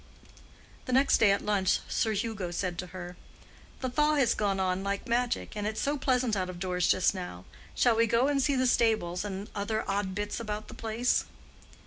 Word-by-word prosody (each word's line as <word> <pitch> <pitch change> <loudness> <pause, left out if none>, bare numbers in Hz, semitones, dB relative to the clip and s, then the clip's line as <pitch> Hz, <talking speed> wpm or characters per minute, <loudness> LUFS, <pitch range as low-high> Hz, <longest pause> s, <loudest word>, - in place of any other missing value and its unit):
The 255 - -3
next 270 +2 +4
day 220 - +6
at 200 - 0
lunch 200 -3 +2
Sir 220 - 0
Hugo 210 -3 -2
said 175 0 -3
to 180 - -4
her, 180 0 -8 0.7
"The 260 - -1
thaw 300 +3 +3
has 270 -6 +3
gone 200 -2 0
on 185 0 0
like 200 0 -2
magic, 240 -1 -1
and 210 0 -2
it's 215 0 -3
so 285 +1 0
pleasant 255 -4 +1
out 185 -2 -1
of 180 - -7
doors 180 -1 0
just 185 +1 +3
now—shall 185 - -2
we 230 +1 +3
go 235 +4 +3
and 285 -1 +2
see 280 +1 +2
the 255 0 +2
stables 220 -8 +2
and 200 -1 -5
the - - -18
other 215 +2 -2
odd 195 -1 -1
bits 205 +2 -3
about 215 -1 -5
the - - -9
place?" 225 +3 0
210 Hz, 200 wpm, -29 LUFS, 190-240 Hz, 0.7 s, day